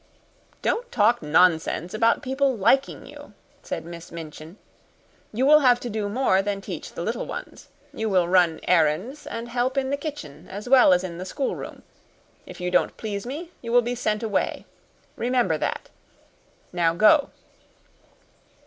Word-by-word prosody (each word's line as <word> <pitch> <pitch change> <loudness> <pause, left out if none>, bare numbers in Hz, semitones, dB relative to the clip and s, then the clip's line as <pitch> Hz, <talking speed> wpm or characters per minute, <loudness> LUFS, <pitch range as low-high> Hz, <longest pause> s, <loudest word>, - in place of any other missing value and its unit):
"Don't - - -1
talk 240 - +3
nonsense 165 +2 +2
about 230 +1 +2
people 265 -1 0
liking 270 +7 +1
you," - - -13 0.3
said - - -5
Miss 170 +1 -10
Minchin. 160 +2 -9 0.7
"You 245 +5 0
will 300 +2 +7
have 250 -4 +4
to 240 - -5
do 210 -1 -2
more 205 -4 +2
than 200 0 -3
teach 195 - -7
the - - -5
little - - -3
ones. - - -8 0.3
You 220 0 -2
will 185 -3 +2
run 175 -3 +3
errands 180 - +1
and 230 +1 -5
help 250 +3 -1
in 270 0 0
the 280 - 0
kitchen 180 - -8
as 205 +4 -7
well 255 -6 +6
as 180 0 +3
in 175 -2 -6
the - - -4
schoolroom. 265 +8 -5 0.6
If - - -11
you 180 0 -3
don't 180 - +1
please 205 0 -5
me, 320 +6 -6
you 230 - -6
will 245 0 +5
be 240 +1 -2
sent 215 -3 -2
away. 215 -3 -1 0.5
Remember 240 -10 0
that. - - -3 0.8
Now 165 -2 +1
go." 280 - +5
215 Hz, 160 wpm, -24 LUFS, 180-255 Hz, 0.8 s, will